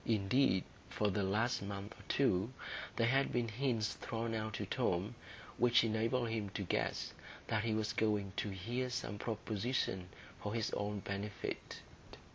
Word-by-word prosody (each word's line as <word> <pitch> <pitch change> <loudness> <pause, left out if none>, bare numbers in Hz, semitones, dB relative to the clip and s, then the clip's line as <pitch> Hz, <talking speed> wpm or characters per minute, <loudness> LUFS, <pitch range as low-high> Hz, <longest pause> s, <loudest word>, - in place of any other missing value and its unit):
Indeed, 105 -1 +4 0.3
for 105 -1 +1
the 100 - +1
last 105 +6 +2
month 100 +1 -5
or - - -15
two, 110 -5 +3 0.4
there 115 - +3
had 135 +3 +3
been 120 -2 +1
hints 115 -2 +1
thrown 115 0 -3
out 110 -1 -2
to 105 - -2
Tom 100 -1 +1 0.5
which 120 -1 +6
enabled 115 +2 +1
him 110 -3 -1
to 100 - -1
guess 90 - 0 0.3
that 110 -1 +1
he 110 -1 +2
was 110 -1 0
going 105 -3 +1
to 105 - 0
hear 120 +7 -2
some 105 -4 -3
proposition 110 -4 -1 0.3
for 105 +2 -2
his 115 -2 0
own 105 0 -1
benefit. 100 +2 -4
110 Hz, 155 wpm, -37 LUFS, 100-115 Hz, 0.5 s, which